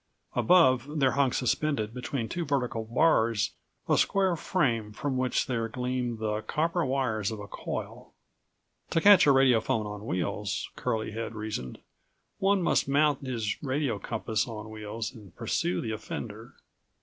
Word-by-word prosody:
Above 150 Hz, -5 st, +4 dB
there 135 Hz, -2 st, +4 dB
hung 140 Hz, -2 st, +2 dB
suspended 125 Hz, -3 st, 0 dB
between 125 Hz, -1 st, -3 dB
two 170 Hz, +6 st, -3 dB
vertical 125 Hz, -6 st, -1 dB
bars 115 Hz, -4 st, +2 dB, 0.4 s
a -, -, +4 dB
square 190 Hz, -3 st, +2 dB
frame 120 Hz, -, 0 dB
from 130 Hz, +5 st, -3 dB
which 130 Hz, 0 st, +1 dB
there 115 Hz, -3 st, -1 dB
gleamed 125 Hz, 0 st, -2 dB
the 110 Hz, -1 st, -2 dB
copper 165 Hz, +7 st, 0 dB
wires 130 Hz, -7 st, 0 dB
of 110 Hz, -2 st, -5 dB
a 100 Hz, -, -7 dB
coil. -, -, -6 dB, 0.8 s
To -, -, +2 dB
catch 200 Hz, -2 st, +7 dB
a -, -, +8 dB
radiophone 125 Hz, -5 st, +3 dB
on 105 Hz, +1 st, -7 dB
wheels, 100 Hz, +3 st, -2 dB
Curlie 110 Hz, -1 st, -2 dB
had 115 Hz, +1 st, -5 dB
reasoned, 105 Hz, -, -5 dB, 0.6 s
one 195 Hz, -1 st, +3 dB
must -, -, +2 dB
mount 145 Hz, -1 st, +2 dB
his 115 Hz, -5 st, -2 dB
radio 135 Hz, -5 st, -1 dB
compass 110 Hz, +1 st, -2 dB
on 110 Hz, -2 st, -7 dB
wheels 110 Hz, +1 st, -5 dB
and 105 Hz, -8 st, -14 dB
pursue 90 Hz, +1 st, -1 dB
the 110 Hz, -, -3 dB
offender. 110 Hz, -, -6 dB
120 Hz, 150 wpm, -28 LUFS, 110-140 Hz, 0.8 s, a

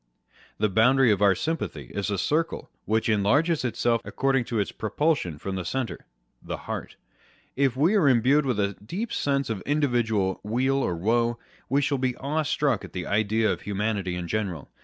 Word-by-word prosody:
The 105 Hz, -, +2 dB
boundary 120 Hz, +5 st, +4 dB
of 100 Hz, -1 st, +1 dB
our 100 Hz, -2 st, +5 dB
sympathy 90 Hz, -, -4 dB
is 100 Hz, 0 st, -2 dB
a 100 Hz, -, -1 dB
circle 160 Hz, -, -1 dB
which 110 Hz, +1 st, +1 dB
enlarges 135 Hz, -, +2 dB
itself 120 Hz, -1 st, +1 dB
according 135 Hz, -2 st, 0 dB
to 115 Hz, -, -3 dB
its 100 Hz, -, 0 dB
propulsion 110 Hz, -, -1 dB
from 95 Hz, +6 st, -5 dB
the 95 Hz, -, -3 dB
centre 130 Hz, +4 st, -3 dB, 0.5 s
â€" -, -, -17 dB
the -, -, -3 dB
heart. -, -, -6 dB, 0.6 s
If 135 Hz, -2 st, +1 dB
we 160 Hz, +9 st, +3 dB
are 185 Hz, -10 st, +4 dB
imbued 130 Hz, +4 st, +4 dB
with 120 Hz, -5 st, 0 dB
a 100 Hz, 0 st, +1 dB
deep 205 Hz, -, -4 dB
sense 140 Hz, -3 st, 0 dB
of 100 Hz, -4 st, -3 dB
individual 120 Hz, -9 st, 0 dB
weal 130 Hz, +6 st, 0 dB
or 90 Hz, -10 st, 0 dB
woe, 115 Hz, +6 st, +1 dB, 0.3 s
we 140 Hz, +3 st, +2 dB
shall 140 Hz, -1 st, 0 dB
be 130 Hz, -1 st, 0 dB
awestruck 145 Hz, -4 st, 0 dB
at -, -, -10 dB
the 90 Hz, -1 st, -4 dB
idea 110 Hz, +1 st, +1 dB
of -, -, -4 dB
humanity 100 Hz, -2 st, -2 dB
in 90 Hz, -1 st, -4 dB
general. 95 Hz, -7 st, -3 dB
115 Hz, 180 wpm, -26 LUFS, 100-140 Hz, 0.6 s, our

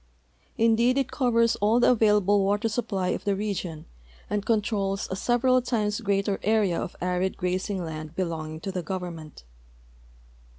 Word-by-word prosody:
Indeed 230 Hz, +3 st, +3 dB
it 270 Hz, -2 st, 0 dB
covers 230 Hz, -3 st, +2 dB
all 215 Hz, +4 st, +3 dB
the 245 Hz, -, +5 dB
available 210 Hz, -3 st, +3 dB
water 205 Hz, +3 st, +1 dB
siij) 225 Hz, +1 st, -2 dB
})1}' 190 Hz, -4 st, -1 dB
of -, -, -5 dB
the 200 Hz, -1 st, +1 dB
region 190 Hz, -6 st, -4 dB, 0.5 s
and 205 Hz, -1 st, 0 dB
controls 205 Hz, -3 st, 0 dB
a -, -, -1 dB
several 250 Hz, +4 st, +2 dB
times 215 Hz, -3 st, -1 dB
greater 200 Hz, -1 st, 0 dB
area 210 Hz, -5 st, +1 dB
ol' -, -, -3 dB
arid 180 Hz, +1 st, -1 dB
grazing 185 Hz, 0 st, -2 dB
land 155 Hz, 0 st, -7 dB
l)elonging 160 Hz, -3 st, -4 dB
to 195 Hz, -, -3 dB
the 185 Hz, -1 st, -3 dB
government. 170 Hz, -, -6 dB
200 Hz, 155 wpm, -26 LUFS, 180-225 Hz, 0.5 s, the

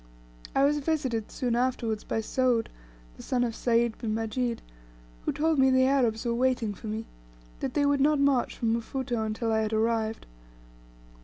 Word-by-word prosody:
I 270 Hz, -, +4 dB
was 295 Hz, +1 st, +2 dB
visited 270 Hz, -8 st, -1 dB
soon 245 Hz, -2 st, -1 dB
afterwards 240 Hz, -3 st, -1 dB
by 225 Hz, -, -2 dB
Soud, 245 Hz, 0 st, +1 dB, 0.5 s
the -, -, -10 dB
son 250 Hz, -1 st, 0 dB
of 235 Hz, -2 st, -1 dB
Sayd 235 Hz, -1 st, +1 dB
bin 220 Hz, -2 st, -2 dB
Majid, 230 Hz, +2 st, -2 dB, 0.6 s
who -, -, +1 dB
told 315 Hz, -1 st, +1 dB
me 265 Hz, 0 st, +5 dB
the 260 Hz, 0 st, +4 dB
Arabs 250 Hz, -4 st, +1 dB
were 235 Hz, -, +1 dB
waiting 245 Hz, -3 st, +1 dB
for 215 Hz, -, -10 dB
me; 220 Hz, +1 st, -3 dB, 0.5 s
that -, -, -4 dB
they 285 Hz, -, +3 dB
would 285 Hz, -1 st, +2 dB
not 295 Hz, +1 st, +3 dB
march 275 Hz, -3 st, +2 dB
from 225 Hz, -1 st, +1 dB
Mfuto 240 Hz, 0 st, -2 dB
until 220 Hz, +1 st, -2 dB
I 220 Hz, -, +2 dB
had 220 Hz, 0 st, -1 dB
arrived. 220 Hz, 0 st, 0 dB
235 Hz, 175 wpm, -28 LUFS, 225-265 Hz, 0.6 s, me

